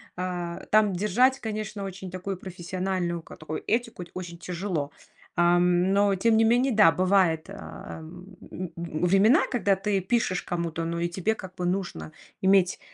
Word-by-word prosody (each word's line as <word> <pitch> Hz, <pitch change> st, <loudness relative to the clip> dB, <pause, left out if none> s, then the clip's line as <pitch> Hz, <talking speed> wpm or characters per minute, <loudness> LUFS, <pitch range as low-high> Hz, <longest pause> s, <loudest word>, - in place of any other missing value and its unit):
А, 175 Hz, -1 st, -4 dB
там 210 Hz, -2 st, +4 dB
держать, 235 Hz, +8 st, +2 dB
конечно, 215 Hz, -2 st, -4 dB
очень 190 Hz, -1 st, -7 dB
такую 185 Hz, +1 st, -4 dB
профессиональную 180 Hz, -1 st, -3 dB
ка -, -, -12 dB
такую 155 Hz, 0 st, -6 dB
этику 230 Hz, -5 st, -1 dB
т -, -, -16 dB
очень 175 Hz, -2 st, -7 dB
тяжело. 175 Hz, -5 st, -3 dB, 0.4 s
Ам, 175 Hz, +2 st, +3 dB
но 200 Hz, 0 st, +3 dB
тем 220 Hz, +4 st, +3 dB
не 225 Hz, -, +5 dB
менее, 245 Hz, +4 st, +3 dB
да, 205 Hz, -6 st, +7 dB
бывает, 185 Hz, -3 st, +2 dB
ам, 180 Hz, -1 st, -10 dB, 0.2 s
м- 180 Hz, -2 st, -5 dB
времена, 180 Hz, -, +3 dB
когда 210 Hz, -6 st, +2 dB
ты 195 Hz, 0 st, 0 dB
пишешь 190 Hz, -2 st, 0 dB
кому-то, 170 Hz, -1 st, -3 dB
ну 170 Hz, 0 st, -2 dB
и 170 Hz, -, 0 dB
тебе 190 Hz, +5 st, 0 dB
как 190 Hz, -3 st, -10 dB
бы 180 Hz, -1 st, -3 dB
нужно 175 Hz, -, -3 dB, 0.3 s
иметь, 190 Hz, -1 st, +3 dB
185 Hz, 160 wpm, -26 LUFS, 175-200 Hz, 0.4 s, да